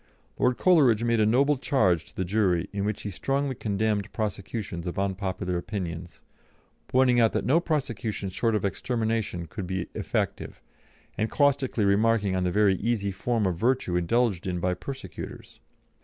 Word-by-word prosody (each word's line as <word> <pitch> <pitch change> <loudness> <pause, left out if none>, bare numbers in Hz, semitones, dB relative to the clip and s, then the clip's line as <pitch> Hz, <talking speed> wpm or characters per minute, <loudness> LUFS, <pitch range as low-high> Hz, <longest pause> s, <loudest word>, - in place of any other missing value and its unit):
Lord 125 0 +2
Coleridge 135 - +4
made 115 -1 +2
a 105 - +4
noble 140 +6 +3
charge 95 - +2
to - - -16
the 95 - -2
jury, 90 -3 +1
in 100 0 -1
which 105 0 -2
he 105 - -4
strongly 135 +7 -1
condemned 105 -2 -1
prosecutions 100 -4 -4
of 85 - -4
unpopular 95 -2 -2
opinions, 90 -3 -5 0.6
pointing 125 -1 +4
out 115 -2 +4
that - - -1
no 140 +8 +4
prosecution 115 - -2
short 115 +4 0
of 105 - 0
extermination 110 -3 -1
could 90 +3 -6
be 95 -1 -3
effective, - - -3 0.6
and 110 - +1
caustically 140 -6 +2
remarking 100 -1 +2
on 95 - 0
the 90 - +1
very 100 -1 +3
easy 105 -3 -1
form 110 +3 -1
of 90 -3 0
virtue 120 -6 +1
indulged 100 +1 +1
in 90 -1 -1
by 90 +1 0
persecutors. 130 +10 -8
105 Hz, 160 wpm, -27 LUFS, 95-120 Hz, 0.6 s, Coleridge